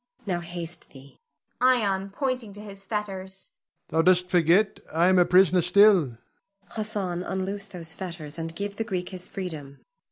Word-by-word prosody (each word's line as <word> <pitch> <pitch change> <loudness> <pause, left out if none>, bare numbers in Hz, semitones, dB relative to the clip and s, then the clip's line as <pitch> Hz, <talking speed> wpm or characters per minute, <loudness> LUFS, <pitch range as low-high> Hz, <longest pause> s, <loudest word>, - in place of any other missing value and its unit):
Now 180 -4 -1
haste 170 0 -7
thee. 135 0 -16 0.4
Ion 205 -7 +2
[pointing 250 -1 -3
to 205 - -11
his 200 -2 -10
fetters]. 195 -2 -5 0.4
Thou 160 +1 +2
dost 180 +1 +3
forget 180 +4 +3
I 170 +3 +3
am 185 -1 +5
a 175 - +6
prisoner 180 -1 +5
still. 200 +5 +6
Zuleika. 120 -3 -11 0.5
Hassan, 205 -4 -3
unloose 195 +2 -3
these 165 -4 -3
fetters, 170 -4 -6
and 165 0 -5
give 200 +1 -4
the 225 - 0
Greek 185 -5 -3
his 185 -2 -5
freedom. 155 -7 -6
185 Hz, 160 wpm, -26 LUFS, 170-200 Hz, 0.5 s, a